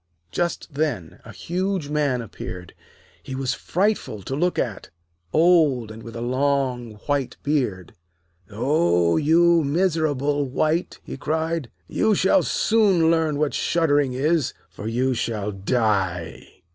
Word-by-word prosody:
Just 170 -2 -2
then 135 - -2
a - - -11
huge 185 -3 -2
Man 145 -5 0
appeared. 90 -5 -8 0.5
He 130 - -7
was 135 -1 -1
frightful 180 - -1
to 135 - -4
look 175 +5 0
at, 110 -7 -3 0.4
old, 155 - +3
and 110 +1 -10
with 115 0 -10
a 115 - -5
long 130 -2 0
white 140 -4 -1
beard. 125 - -1 0.6
'Oh, 110 - +2
you 165 +2 +4
miserable 145 -3 0
wight!' 155 +6 0
he - - -7
cried. 160 -1 -2 0.2
'You 215 - +2
shall 195 +11 +4
soon 195 -7 +3
learn 160 -3 +1
what 150 -1 0
shuddering 145 -5 +1
is, 150 +2 0 0.2
for 105 - -7
you 125 +3 +1
shall 110 -3 -2
die.' 95 -5 -2
140 Hz, 130 wpm, -23 LUFS, 115-165 Hz, 0.6 s, you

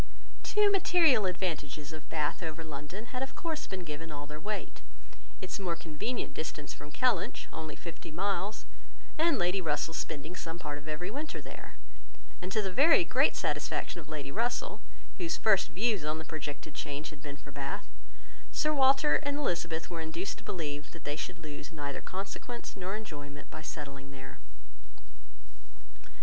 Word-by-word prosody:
Two 420 -1 +5
material 330 - +6
advantages 160 -5 -1
of 155 -1 -8
Bath 150 +1 +1
over 160 -1 -3
London 160 - -6
had 250 - -1
of 270 - -2
course 330 -5 -2
been 190 -1 -3
given 160 0 -5
all 145 -1 -4
their 150 +1 -6
weight: 210 +5 -3 0.6
its 185 - -3
more 175 -3 +1
convenient 165 +11 -2
distance 155 -2 -3
from 150 - -9
Kellynch, 250 +8 +2
only 155 -2 -4
fifty 170 -2 -7
miles, 195 +5 0 0.5
and 330 -2 +5
Lady 180 0 +3
Russell's 160 0 +1
spending 155 +3 -3
some 165 -2 -4
part 145 -4 -3
of 150 - -13
every 155 +5 -2
winter 295 +6 -3
there; - - -9 0.7
and 180 +1 -3
to 215 +2 +3
the 190 - 0
very 285 - +8
great - - +5
satisfaction 170 - 0
of 155 - -13
Lady 145 -3 -3
Russell, 240 - 0 0.4
whose 340 -2 +1
first 195 -3 +6
views 195 +2 +2
on 155 +1 0
the 160 - -5
projected 150 -1 -4
change 150 0 -3
had 150 -2 -11
been 145 -1 -5
for 145 -1 -11
Bath, 140 0 -3 0.7
Sir 305 0 +3
Walter 270 +1 +7
and 285 -1 -1
Elizabeth 170 - 0
were 165 -1 -2
induced 165 +4 -2
to - - -14
believe 150 -4 -2
that 165 - -10
they 145 - -1
should 170 - -3
lose 150 -2 -6
neither 145 -3 -3
consequence 200 +5 -4
nor 190 +1 -2
enjoyment 145 -9 -7
by 155 - -6
settling 140 -3 -5
there. 135 -1 -9
165 Hz, 165 wpm, -33 LUFS, 150-215 Hz, 0.7 s, very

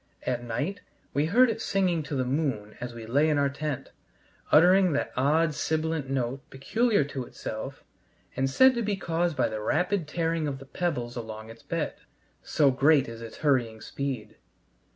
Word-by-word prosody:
At 120 -1 -2
night 145 - -3 0.3
we 145 +2 +2
heard 240 +7 +5
it - - -5
singing 185 -4 +1
to 150 -1 -5
the 130 -1 0
moon 125 -6 -1
as 120 -1 -5
we 115 -1 -7
lay 140 +7 +3
in 150 - +2
our 140 -1 +2
tent, 140 -1 -4 0.6
uttering 180 +2 +6
that 145 - -1
odd 150 +5 +2
sibilant 155 -1 -1
note 135 0 -1
peculiar 215 - +1
to 140 -2 -5
itself 120 +2 -7 0.5
and 135 +1 +1
said 260 - +6
to 235 - -1
be 210 -2 0
caused 170 -4 -1
by 130 - +3
the 110 -1 -4
rapid 175 - 0
tearing 165 -1 -1
of 140 -2 -3
the 135 - -11
pebbles 135 -7 -2
along 110 -1 -7
its 115 - -14
bed, - - -2 0.5
so 145 -3 +3
great 140 +2 +4
is 115 0 -8
its 115 -1 -9
hurrying 120 -6 +2
speed. 135 -1 -5
140 Hz, 175 wpm, -27 LUFS, 125-165 Hz, 0.6 s, uttering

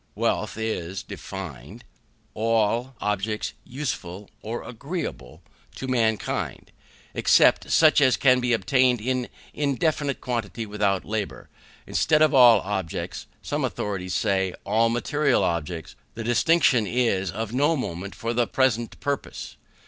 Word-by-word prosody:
Wealth - - -1
is 100 -4 -3
defined, 90 -11 -8 0.5
all 115 +3 0
objects 105 +1 -2
useful 105 -8 -5
or 115 +2 -5
agreeable 110 - -6 0.3
to 130 - -6
mankind, 115 -4 -1 0.4
except - - +4
such 155 -2 +5
as 130 -2 +4
can 125 -2 +4
be 125 0 0
obtained 125 +3 +3
in 125 +2 -2 0.2
indefinite 145 0 0
quantity 115 -2 -3
without 105 -2 0
labour. 105 -1 -4 0.4
Instead 155 -1 +3
of 155 - +3
all 120 -5 +7
objects, 95 -4 -4 0.2
some - - -2
authorities 95 -3 -3
say, 95 -2 0
all 110 +3 +2
material 140 +4 +1
objects: 85 0 -3 0.2
the 115 - -5
distinction 120 -1 +3
is 105 -6 +1
of 110 +5 -4
no 145 +5 +3
moment 95 - -5
for 115 +4 -3
the 120 -1 +1
present 120 -3 0
purpose. 140 -1 -4
115 Hz, 125 wpm, -25 LUFS, 100-130 Hz, 0.5 s, all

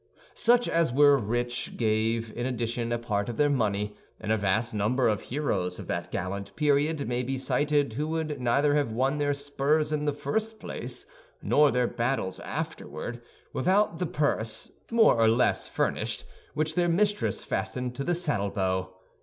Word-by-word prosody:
Such 245 +1 +3
as 165 -4 +2
were 145 +2 +6
rich 120 0 -2
gave 110 0 0
in 120 +1 -2
addition 120 -1 -2
a 120 - +1
part 105 -2 -2
of 115 - -5
their 145 0 +3
money; 105 -5 0 0.2
and 110 -1 -3
a - - +4
vast 110 +4 0
number 110 +5 +1
of 105 -3 +1
heroes 95 -11 -2
of - - -7
that 85 0 -2
gallant 100 +3 -4
period 150 -1 +1
may 125 +1 0
be 130 +2 -2
cited 145 0 +1
who 150 +6 -2
would 155 -3 -2
neither 140 +4 +3
have 145 -5 +1
won 135 +6 0
their 145 -1 +1
spurs 145 +2 0
in 150 0 -1
the 145 - +2
first 215 +10 -2
place, - - -6 0.4
nor 150 0 +5
their 125 -2 +2
battles 120 -6 -1
afterward, 120 +9 -5 0.3
without 185 +3 +2
the 180 - 0
purse, 115 -8 -1 0.2
more 230 -1 +5
or 110 - +6
less 115 +3 +2
furnished, - - -1 0.3
which 155 +1 0
their 175 +1 +2
mistress 205 +4 +1
fastened 125 -1 -3
to 140 - -4
the 175 +4 +1
saddle 145 - 0
bow. 95 -1 -1
130 Hz, 170 wpm, -28 LUFS, 110-150 Hz, 0.4 s, were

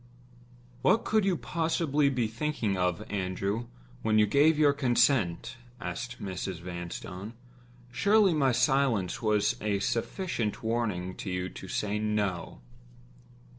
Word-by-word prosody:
"What 220 - +3
could 215 -2 +2
you 190 -3 +2
possibly 160 -4 +1
be 125 -4 0
thinking 115 -2 -2
of, 90 -2 0
Andrew, 100 +3 -2 0.3
when 110 -1 +2
you 105 - +6
gave 145 +8 +4
your 145 -2 +5
consent?" 120 - +1 0.2
said 120 +1 -5
Mrs. 95 -2 -4
Vanstone. 90 +4 -7 0.6
"Surely 200 - +4
my 140 -4 +3
silence 125 -5 +1
was 105 -2 +2
a 105 -2 0
sufficient 115 - -2
warning 105 -6 -1
to 100 - -5
you 90 0 -2
to 95 - -10
say 105 +2 -1
No?" 105 -9 -2
110 Hz, 125 wpm, -29 LUFS, 95-140 Hz, 0.6 s, you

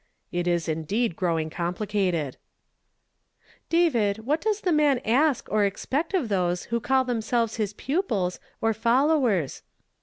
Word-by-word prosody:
"It 175 0 -1
is 175 -1 +1
indeed 165 +6 -1
growing 165 -3 -1
complicated! 175 -4 -1 0.5
" - - -49
" - - -50 0.3
David, 230 -11 +2
what 300 +5 +1
does 430 -1 0
the 365 - +1
man 300 -4 +4
ask 270 +4 +2
or 215 -1 +3
expect 275 - -1
of 320 -10 +1
those 180 -3 0
who 235 - +2
call 265 +3 +2
themselves 230 -2 -1
his 210 -2 -1
pupils, 220 - -1 0.2
or 225 0 +2
follow 265 +7 +3
ers?" 175 - -1
220 Hz, 150 wpm, -26 LUFS, 180-270 Hz, 0.5 s, man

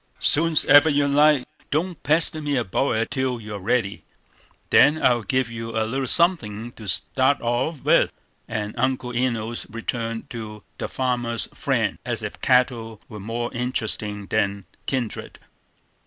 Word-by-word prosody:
"Soon's 160 +1 +3
ever 145 +2 +7
you 145 -1 +2
like. 145 -1 +4 0.2
Don't 165 +3 -2
pester 155 +1 +2
me 145 -2 -1
about 120 +4 0
it 115 +1 -1
till 130 -3 -1
you're 105 -2 -7
ready; 100 0 -1 0.7
then 150 +2 +6
I'll 120 -4 +3
give 130 0 -1
you 115 0 -5
a 110 - +1
little 130 +4 -2
suthing 120 - +3
to 110 -3 -11
start 130 +7 +1
off 125 +6 -2
with." - - +4 0.4
And 105 -1 -4
Uncle 130 -2 -1
Enos 120 -2 -2
returned 115 0 -4
to 105 -3 -7 0.2
"The - - -2
Farmer's 120 -3 -2
Friend," - - -1
as - - -3
if - - -6
cattle 120 -4 +1
were 105 - -8
more 115 +4 -4
interesting 110 -4 -2
than 100 0 -1 0.2
kindred. 125 -5 -3
120 Hz, 145 wpm, -23 LUFS, 110-135 Hz, 0.7 s, ever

